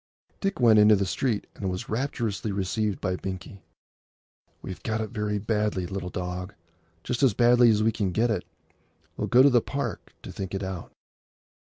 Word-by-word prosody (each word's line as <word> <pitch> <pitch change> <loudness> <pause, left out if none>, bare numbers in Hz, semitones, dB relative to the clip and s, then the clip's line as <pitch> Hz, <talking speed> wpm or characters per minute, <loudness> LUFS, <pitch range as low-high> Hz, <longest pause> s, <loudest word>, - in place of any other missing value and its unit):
Dick 195 0 -2
went 115 -3 +6
into 105 0 +7
the 100 0 0
street, 110 +3 -1
and 95 - -4
was 90 0 -4
rapturously 115 -3 -2
received 100 +1 -1
by 95 -2 0
Binkie. 95 +1 -7 1.0
"We've 95 - -7
got 110 -1 -2
it 110 -2 -4
very 105 -1 -1
badly, 105 -3 -1
little 95 0 -4
dog! 90 +2 -5 0.5
Just 125 +1 -2
as 130 -8 +4
badly 120 0 +6
as 110 -1 +3
we 115 - +3
can 100 -4 -1
get 115 +6 +1
it. 105 - -1 0.7
We'll - - -2
go 125 +2 +6
to 140 - +7
the 120 -2 +4
Park 140 +4 -5
to - - -8
think 95 0 -5
it 95 - -3
out." 95 -2 -6
105 Hz, 180 wpm, -26 LUFS, 95-115 Hz, 1.0 s, into